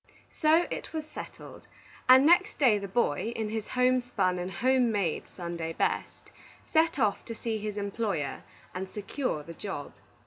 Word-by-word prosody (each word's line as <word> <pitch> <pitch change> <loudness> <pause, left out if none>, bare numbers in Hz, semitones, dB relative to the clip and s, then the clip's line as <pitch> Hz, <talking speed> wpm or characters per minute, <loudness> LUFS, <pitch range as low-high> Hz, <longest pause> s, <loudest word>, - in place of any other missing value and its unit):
So 320 +2 +3
it - - -5
was 315 -1 -3
settled, 310 - -10 0.4
and 260 +2 +9
next 355 +5 +4
day 240 -8 +4
the 200 - -5
boy, 220 +1 0
in 220 -1 -2
his 220 -1 -3
home 255 0 +3
spun 185 -7 0
and 180 +1 -3
home 245 +6 +2
made 195 -7 -1
Sunday 170 -2 -5
best, - - -2 0.4
set 320 -1 +3
off 215 -6 +1
to 230 - -6
see 225 -1 -3
his 210 0 -4
employer 200 -8 -2 0.3
and 185 +1 -4
secure 205 - -3
the 170 - -9
job. 165 -5 -6
215 Hz, 165 wpm, -29 LUFS, 185-255 Hz, 0.4 s, and